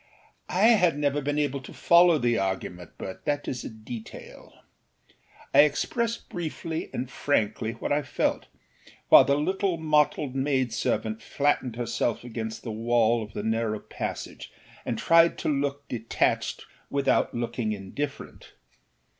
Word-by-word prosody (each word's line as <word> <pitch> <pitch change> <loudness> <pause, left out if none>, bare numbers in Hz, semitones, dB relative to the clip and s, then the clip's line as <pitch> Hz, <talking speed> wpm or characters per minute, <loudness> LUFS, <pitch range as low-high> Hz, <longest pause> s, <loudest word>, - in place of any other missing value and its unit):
I 185 - 0
had 180 -10 +4
never 145 0 0
been 145 +1 -1
able 145 -2 0
to 125 - -11
follow 170 -1 +5
the 120 -4 +1
argument, 90 -2 -4
but 95 - -7
that 145 0 -1
is 125 - -3
a - - -5
detail. 110 +1 -10 1.0
I - - +6
expressed 230 - +2
briefly 165 -3 -4
and 125 - -3
frankly 115 -4 -1
what 115 - -5
I 145 +1 +2
felt, - - -1 0.6
while - - +9
the 140 0 +2
little 190 +3 0
mottled 150 -3 +1
maidservant 130 -5 -1
flattened 140 -4 0
herself 120 -1 -1
against 110 -2 -5
the 115 - -4
wall 115 +1 +2
of 105 -1 -8
the 105 - -4
narrow 110 0 0
passage - - -6 0.4
and 115 - -1
tried 165 +6 +4
to - - -2
look 140 0 -1
detached 115 -2 -1 0.2
without 140 -3 +1
looking 120 -1 -2
indifferent. 105 +8 -6
135 Hz, 140 wpm, -26 LUFS, 115-150 Hz, 1.0 s, while